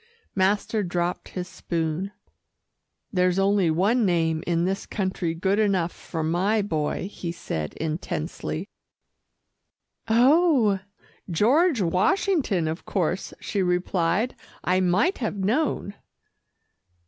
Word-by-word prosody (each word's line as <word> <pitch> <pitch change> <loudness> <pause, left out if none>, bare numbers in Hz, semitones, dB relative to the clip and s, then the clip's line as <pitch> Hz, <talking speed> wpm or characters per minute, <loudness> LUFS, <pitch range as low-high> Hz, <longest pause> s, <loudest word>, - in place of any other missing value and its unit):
Master 200 +3 +1
dropped 175 -1 -2
his 180 -1 -5
spoon. 175 0 -3 1.0
"There's 180 -1 +2
only 195 -2 +3
one 200 +9 +2
name 165 -4 +1
in 170 0 +1
this 195 +1 -2
country 185 -4 -2
good 190 +4 +1
enough 190 -5 +2
for 160 -2 -5
my 190 +7 +1
boy," 160 -1 -2
he 180 -4 -5
said 80 - -4
intensely. 160 +2 -3 1.4
"Oh! 245 - +4 0.5
George 255 - +3
Washington, 200 - +1
of 160 +2 -4
course," 185 0 -1
she 200 - -2
replied. 180 +4 +1 0.3
"I 185 +1 +2
might 185 - +2
have 225 -4 -2
known." 210 +1 0
185 Hz, 105 wpm, -25 LUFS, 170-210 Hz, 1.4 s, Oh